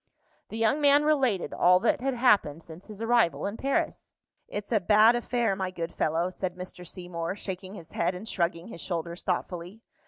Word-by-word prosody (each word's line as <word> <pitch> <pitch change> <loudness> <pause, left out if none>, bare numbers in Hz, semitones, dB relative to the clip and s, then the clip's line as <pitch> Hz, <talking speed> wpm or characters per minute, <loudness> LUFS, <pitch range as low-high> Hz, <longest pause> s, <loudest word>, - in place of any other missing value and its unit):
The 220 - -6
young 225 +7 +2
man 290 0 +5
related 265 - +1
all 180 +1 +5
that 230 - +1
had 270 0 -1
happened 200 - +3
since 165 +3 -12
his 215 0 -7
arrival 230 -7 +2
in 200 +2 -3
Paris. 275 +3 -2 0.4
"It's 205 +2 -6
a 220 - +4
bad 215 +5 +5
affair, 240 -3 0
my 190 -1 -2
good 170 -2 -5
fellow," 165 +4 0
said 185 -1 -4
Mr. 180 -1 -8
Seymour, 175 -1 -5
shaking 190 -1 -6
his 170 -5 -11
head 170 +2 0
and 200 +5 -8
shrugging 170 -1 -1
his 170 - -8
shoulders 170 -1 -4
thoughtfully. 180 +2 -3
190 Hz, 185 wpm, -28 LUFS, 175-230 Hz, 0.4 s, man